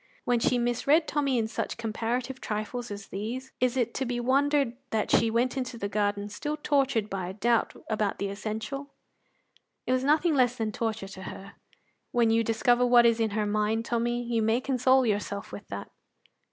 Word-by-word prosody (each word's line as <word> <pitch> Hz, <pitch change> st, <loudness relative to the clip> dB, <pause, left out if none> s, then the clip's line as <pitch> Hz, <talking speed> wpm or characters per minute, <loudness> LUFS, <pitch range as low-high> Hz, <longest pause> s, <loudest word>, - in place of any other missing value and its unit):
When 245 Hz, -1 st, +2 dB
she 250 Hz, +1 st, +2 dB
misread 245 Hz, +7 st, +2 dB
Tommy 280 Hz, -4 st, +1 dB
in 225 Hz, -2 st, +1 dB
such 225 Hz, -, -4 dB
comparative 235 Hz, +3 st, -3 dB
trifles 220 Hz, +3 st, -4 dB
as 200 Hz, -1 st, -7 dB
these, 245 Hz, +6 st, -5 dB
is 255 Hz, 0 st, +1 dB
it 245 Hz, -3 st, 0 dB
to 265 Hz, -, -1 dB
be 245 Hz, -1 st, -2 dB
wondered 275 Hz, 0 st, +2 dB
that 220 Hz, -1 st, -1 dB
she 230 Hz, -, +4 dB
went 240 Hz, +4 st, +1 dB
into 255 Hz, -2 st, -3 dB
the 200 Hz, -, -2 dB
garden 205 Hz, 0 st, -1 dB
still 295 Hz, +9 st, -4 dB
tortured 275 Hz, -7 st, +1 dB
by 190 Hz, -3 st, -4 dB
a 190 Hz, -, -7 dB
doubt 230 Hz, +2 st, +1 dB
about 215 Hz, -2 st, 0 dB
the 200 Hz, -, -2 dB
essential? 220 Hz, +7 st, -5 dB, 1.0 s
It -, -, -1 dB
was 255 Hz, 0 st, +2 dB
nothing 310 Hz, +4 st, +3 dB
less 250 Hz, -3 st, +3 dB
than 225 Hz, -3 st, -2 dB
torture 220 Hz, -2 st, -3 dB
to 190 Hz, -1 st, -10 dB
her; 195 Hz, 0 st, -9 dB, 0.6 s
when 235 Hz, -2 st, +3 dB
you 230 Hz, 0 st, +3 dB
discover 240 Hz, +2 st, +2 dB
what 245 Hz, -1 st, +6 dB
is 230 Hz, -1 st, +4 dB
in 225 Hz, -1 st, +2 dB
her 210 Hz, -, +1 dB
mind, 215 Hz, +2 st, 0 dB
Tommy, 240 Hz, +1 st, 0 dB
you 235 Hz, -1 st, 0 dB
may 220 Hz, +2 st, +2 dB
console 260 Hz, 0 st, +3 dB
yourself 205 Hz, -2 st, -2 dB
with 205 Hz, -, -9 dB
that. 100 Hz, -, -7 dB
235 Hz, 190 wpm, -28 LUFS, 215-255 Hz, 1.0 s, what